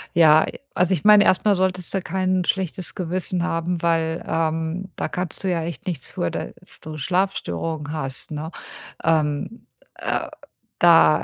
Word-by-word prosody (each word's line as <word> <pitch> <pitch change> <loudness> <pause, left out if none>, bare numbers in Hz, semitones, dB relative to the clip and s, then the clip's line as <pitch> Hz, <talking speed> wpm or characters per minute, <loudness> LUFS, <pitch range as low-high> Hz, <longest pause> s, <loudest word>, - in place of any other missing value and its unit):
Ja. 160 -2 +6 0.3
Also, 180 +1 +3
ich 165 - -2
meine, 210 -1 +8
erstmal 200 +2 +3
solltest 185 -1 -1
du 195 - 0
kein 185 +1 0
schlechtes 185 -1 -1
Gewissen 180 0 -1
haben, 170 0 -1
weil, 165 -1 0
ähm, 165 +3 -1
da - - -2
kannst 180 +1 -5
du 190 - 0
ja 165 -2 0
echt 170 +2 -6
nichts 160 -8 -4
für, 85 - -2
dass - - -8
du 155 0 -7
Schlafstörungen 160 - -2
hast, 135 -1 -4
ne? 155 +2 -5 0.5
Ähm, 155 +6 0 0.3
äh, - - -2 0.5
da, 165 - +6
170 Hz, 150 wpm, -23 LUFS, 155-185 Hz, 0.5 s, meine